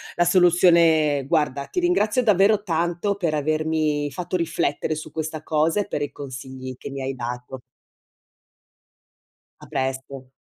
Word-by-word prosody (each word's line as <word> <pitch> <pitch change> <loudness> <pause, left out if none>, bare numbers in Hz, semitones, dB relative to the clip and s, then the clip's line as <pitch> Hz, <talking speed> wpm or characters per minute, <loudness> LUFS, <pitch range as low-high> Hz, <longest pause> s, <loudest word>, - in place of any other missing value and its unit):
la 175 - +3
soluzione 170 -5 +4
guarda 145 -3 0
ti 360 - -3
ringrazio 255 - +2
davvero 205 0 +4
tanto 175 +2 -1
per 170 -6 -1
avermi 155 -1 0
fatto 180 +4 -3
riflettere 155 -2 -1
su 155 0 -8
questa 155 -1 -5
cosa 160 +6 +1
e - - -6
per - - -3
i 145 - -3
consigli 130 -1 -8
che - - -8
mi 135 0 -6
hai 135 +1 -3
dato. 125 +1 -6 2.0
A - - -12
presto. 130 0 -4
155 Hz, 140 wpm, -23 LUFS, 140-175 Hz, 2.0 s, soluzione